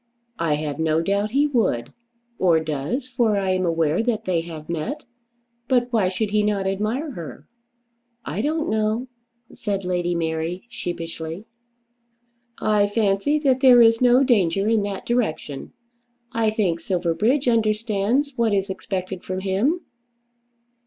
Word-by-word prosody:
"I 165 Hz, -3 st, +1 dB
have 150 Hz, 0 st, -4 dB
no 160 Hz, 0 st, +2 dB
doubt 200 Hz, +3 st, 0 dB
he 280 Hz, +6 st, +2 dB
would, 220 Hz, -, 0 dB, 0.5 s
or 170 Hz, -3 st, +4 dB
does, 160 Hz, -, -3 dB
for 235 Hz, -5 st, +1 dB
I 190 Hz, -1 st, 0 dB
am 185 Hz, -1 st, +1 dB
aware 165 Hz, +1 st, +1 dB
that 225 Hz, -2 st, -1 dB
they 175 Hz, -3 st, +1 dB
have 160 Hz, -2 st, -9 dB
met. 170 Hz, -, -4 dB, 0.6 s
But 245 Hz, -1 st, +1 dB
why 205 Hz, -5 st, +3 dB
should 200 Hz, +3 st, -2 dB
he 210 Hz, 0 st, +3 dB
not 205 Hz, -2 st, 0 dB
admire 215 Hz, +10 st, -1 dB
her?" 170 Hz, -, -9 dB, 0.8 s
"I 185 Hz, +7 st, -2 dB
don't 310 Hz, +4 st, -1 dB
know," 220 Hz, +3 st, 0 dB, 0.4 s
said 200 Hz, -3 st, -3 dB
Lady 175 Hz, -1 st, 0 dB
Mary 165 Hz, +2 st, -2 dB
sheepishly. 165 Hz, -1 st, -6 dB, 1.1 s
"I 210 Hz, -1 st, +2 dB
fancy 205 Hz, +6 st, +1 dB
that 265 Hz, -2 st, +3 dB
there 255 Hz, -2 st, +7 dB
is 230 Hz, +1 st, +4 dB
no 250 Hz, +2 st, +5 dB
danger 200 Hz, -6 st, +2 dB
in 225 Hz, -1 st, +3 dB
that 200 Hz, -1 st, -4 dB
direction. 210 Hz, -, -2 dB, 0.6 s
I 230 Hz, -2 st, +1 dB
think 195 Hz, -6 st, 0 dB
Silverbridge 190 Hz, -, 0 dB
understands 225 Hz, +4 st, +1 dB
what 230 Hz, -4 st, +2 dB
is 195 Hz, 0 st, -1 dB
expected 190 Hz, -1 st, -5 dB
from 185 Hz, 0 st, -4 dB
him." 210 Hz, -, 0 dB
200 Hz, 140 wpm, -23 LUFS, 175-235 Hz, 1.1 s, there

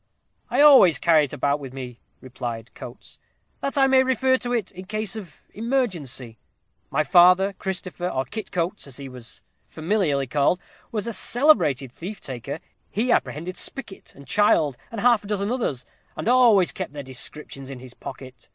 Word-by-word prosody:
"I -, -, +2 dB
always 270 Hz, -, +8 dB
carry 160 Hz, -3 st, +4 dB
it 140 Hz, -, -10 dB
about 140 Hz, +3 st, 0 dB
with 135 Hz, -3 st, -9 dB
me," 125 Hz, -3 st, -8 dB, 0.2 s
replied 120 Hz, -2 st, -6 dB
Coates, -, -, -10 dB, 0.4 s
"that 275 Hz, +1 st, -3 dB
I 270 Hz, -, +6 dB
may 265 Hz, -1 st, +5 dB
refer 260 Hz, 0 st, +2 dB
to 245 Hz, -, -4 dB
it 230 Hz, -5 st, -1 dB
in 185 Hz, -1 st, -10 dB
case 215 Hz, +1 st, -2 dB
of 195 Hz, -7 st, -10 dB
emergency. 180 Hz, -, -2 dB, 0.5 s
My 155 Hz, +3 st, +1 dB
father, 180 Hz, +5 st, +5 dB
Christopher, 185 Hz, -2 st, -3 dB
or 130 Hz, -4 st, -2 dB
Kit 215 Hz, -, -7 dB
Coates, 180 Hz, 0 st, -2 dB
as 135 Hz, -, -8 dB
he 140 Hz, -1 st, -7 dB
was 125 Hz, -3 st, -11 dB, 0.2 s
familiarly 160 Hz, -5 st, 0 dB
called, 145 Hz, +7 st, +1 dB, 0.3 s
was 215 Hz, -4 st, -2 dB
a 235 Hz, -, -3 dB
celebrated 185 Hz, -, +3 dB
thief 185 Hz, -, -7 dB
taker. 135 Hz, +3 st, -6 dB, 0.3 s
He 235 Hz, +4 st, 0 dB
apprehended 175 Hz, -2 st, -1 dB
Spicket, 270 Hz, -8 st, -6 dB
and 140 Hz, -, -13 dB
Child, 150 Hz, -3 st, +3 dB, 0.2 s
and 225 Hz, -3 st, -4 dB
half 240 Hz, -3 st, +4 dB
a -, -, -10 dB
dozen 205 Hz, +1 st, -1 dB
others, 185 Hz, -, -2 dB, 0.3 s
and -, -, -4 dB
always 235 Hz, -7 st, +5 dB
kept -, -, -6 dB
their 145 Hz, -1 st, -6 dB
descriptions 135 Hz, +1 st, -8 dB
in 135 Hz, -, -7 dB
his 125 Hz, 0 st, -12 dB
pocket. 130 Hz, -5 st, -10 dB
175 Hz, 170 wpm, -24 LUFS, 135-215 Hz, 0.5 s, always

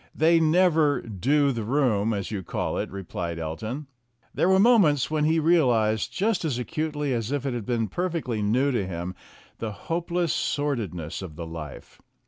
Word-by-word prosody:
"They 165 Hz, +2 st, +4 dB
never 160 Hz, -2 st, +3 dB
do -, -, -11 dB
'do 140 Hz, +5 st, +3 dB
the 115 Hz, -3 st, -3 dB
room' 115 Hz, -4 st, +1 dB
as 100 Hz, -2 st, -3 dB
you 100 Hz, -3 st, -3 dB
call -, -, -3 dB
it," -, -, -3 dB
replied 90 Hz, -3 st, -5 dB
Elton. 95 Hz, -, -4 dB, 0.5 s
There 180 Hz, -, +2 dB
were 190 Hz, -, +5 dB
moments 190 Hz, -, +4 dB
when 155 Hz, -1 st, +1 dB
he 160 Hz, +1 st, +3 dB
realized 125 Hz, -10 st, +2 dB
just 200 Hz, -1 st, 0 dB
as 145 Hz, -7 st, -1 dB
acutely 150 Hz, +1 st, -2 dB
as 115 Hz, 0 st, -2 dB
if 145 Hz, -1 st, -2 dB
it 135 Hz, -, -1 dB
had 120 Hz, -4 st, -5 dB
been 115 Hz, -3 st, 0 dB
perfectly 155 Hz, -, -2 dB
new 125 Hz, +7 st, +2 dB
to 105 Hz, -7 st, -1 dB
him, 90 Hz, 0 st, -4 dB, 0.5 s
the 110 Hz, -1 st, -3 dB
hopeless 170 Hz, -, -2 dB
sordidness 105 Hz, -, -2 dB
of 85 Hz, -5 st, -8 dB
the 85 Hz, +1 st, -6 dB
life. 80 Hz, -3 st, -9 dB
130 Hz, 175 wpm, -26 LUFS, 105-155 Hz, 0.5 s, were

